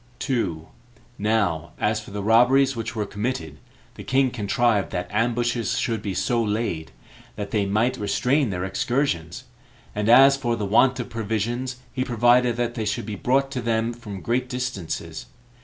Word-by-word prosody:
2. 90 - -2 0.5
Now 100 -7 0
as - - +1
for - - -12
the 100 0 -5
robberies 125 +5 +4
which 115 0 -4
were 105 -2 -1
committed, 100 - -4 0.3
the - - -10
king 130 -1 +2
contrived 115 -2 +1
that 90 - -2
ambushes 115 +1 0
should 115 -3 -1
be 100 -3 -4
so 115 +6 +1
laid, 105 -7 -2 0.4
that 105 -1 -5
they 105 -3 +1
might 110 +5 +1
restrain 125 +6 +1
their 90 -1 -3
excursions; 95 - -1 0.5
and 105 +1 -1
as 135 +3 +8
for 120 -4 -1
the 105 -3 -3
want 125 +6 +3
of - - -4
provisions, 115 +3 -2 0.2
he 130 0 -1
provided 120 0 +3
that 120 0 -1
they 115 -3 -3
should 105 0 -2
be 110 - -5
brought 135 +6 +1
to 130 - -3
them 115 0 0
from 105 -5 -8
great 125 +2 -1
distances. 125 - -4
115 Hz, 165 wpm, -24 LUFS, 105-125 Hz, 0.5 s, as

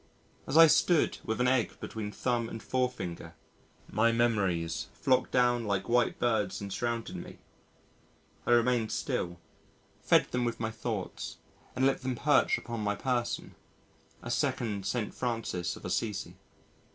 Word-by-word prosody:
As 135 - +1
I 165 - +11
stood 165 +1 +3
with 110 - -2
an 125 - +3
egg 125 -2 +1
between 105 -2 -5
thumb 120 0 -1
and 110 - -7
forefinger, 125 -10 -2 0.5
my 115 +3 +3
memories 100 -8 0
flocked 130 -1 +2
down 120 -2 +2
like 100 -2 -1
white 120 +1 +2
birds 105 -5 0
and 100 -1 -5
surrounded 115 +2 -2
me. - - -9 1.1
I - - +3
remained 120 -1 +3
still, 85 0 -2 0.6
fed - - +3
them 125 0 0
with 120 -1 -2
my 110 -1 -2
thoughts - - -4 0.4
and 130 - +2
let 135 - +2
them 130 -1 -2
perch 145 +3 +3
upon 120 -1 -5
my 105 -1 0
person 125 +1 -2 0.7
a - - -4
second 100 -5 -1
St. 115 -4 -2
Francis 115 -8 -2
of - - -11
Assisi. 100 +2 -2
115 Hz, 145 wpm, -30 LUFS, 105-125 Hz, 1.1 s, I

